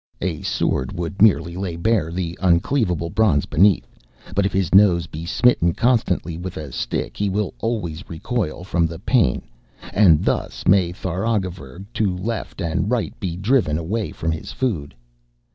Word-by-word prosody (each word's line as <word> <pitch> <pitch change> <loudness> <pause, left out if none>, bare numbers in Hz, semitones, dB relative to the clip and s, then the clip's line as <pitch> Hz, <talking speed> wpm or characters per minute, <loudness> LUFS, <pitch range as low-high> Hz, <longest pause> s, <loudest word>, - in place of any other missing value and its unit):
A 85 -3 -2
sword 65 0 -1
would 85 +3 -4
merely 85 -5 +4
lay 90 -2 -3
bare 85 -1 +1
the 85 -1 -3
uncleavable 90 - +1
bronze 100 -10 +3
beneath, 95 +4 +3 0.5
but 100 -1 +3
if - - -5
his 95 -3 -1
nose 95 -4 +5
be 80 +1 -8
smitten 85 -5 +3
constantly 100 -9 +1
with 90 0 -6
a 75 -3 -6
stick - - -3
he 100 -1 -1
will 100 0 -1
always 95 -8 -3
recoil 85 0 -3
from 85 -2 +1
the 80 0 -7
pain, 110 +3 +1 0.5
and 90 -7 +5
thus - - -2
may 95 -2 +4
Tharagavverug, 95 - -3
to 95 -4 0
left 110 +1 -4
and 90 +4 -1
right, 120 -3 -1
be 90 -3 -3
driven 95 - +2
away 100 +7 -2
from 80 - -2
his 80 - -5
food.' 85 - -2
90 Hz, 160 wpm, -21 LUFS, 85-105 Hz, 0.5 s, nose